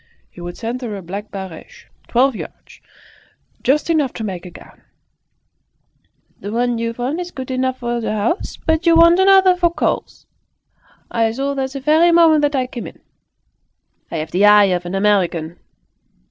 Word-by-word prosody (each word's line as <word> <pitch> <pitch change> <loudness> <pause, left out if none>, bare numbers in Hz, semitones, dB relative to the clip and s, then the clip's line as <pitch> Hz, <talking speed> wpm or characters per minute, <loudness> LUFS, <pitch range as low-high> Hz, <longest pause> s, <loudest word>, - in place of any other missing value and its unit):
He 175 - -13
would 175 0 -7
send 240 +3 -4
her 225 -4 -5
a 195 - -7
black 200 +5 -7
barege, 190 -5 -10 0.2
twelve 255 +1 +2
yards, - - -11 0.8
just 285 +4 +1
enough 305 -6 +1
to 225 - -6
make 185 -4 -5
a - - -9
gown. 170 - -16 1.6
"The 205 - -6
one 240 +1 0
you've 230 +1 -4
on 265 +7 -2
is 355 0 -5
good 260 -6 -7
enough 260 0 -1
for 240 0 -2
the 220 - -2
house, 220 - -2
but 320 +1 -1
you 335 - +6
want 335 +2 +6
another 380 -1 +5
for 350 -1 +1
calls. 340 - -3 0.9
I 225 -1 +1
saw 275 +4 -2
that 265 -1 -3
the 275 - -5
very 310 +5 +4
moment 330 -3 +5
that 290 0 +1
I 260 -1 +1
came 250 -2 -7
in. - - -13 1.1
I've 160 -1 -5
the 185 +3 +1
eye 205 -2 +6
of 175 0 -3
an 180 - -4
American!" 180 -5 0
245 Hz, 175 wpm, -18 LUFS, 205-305 Hz, 1.6 s, you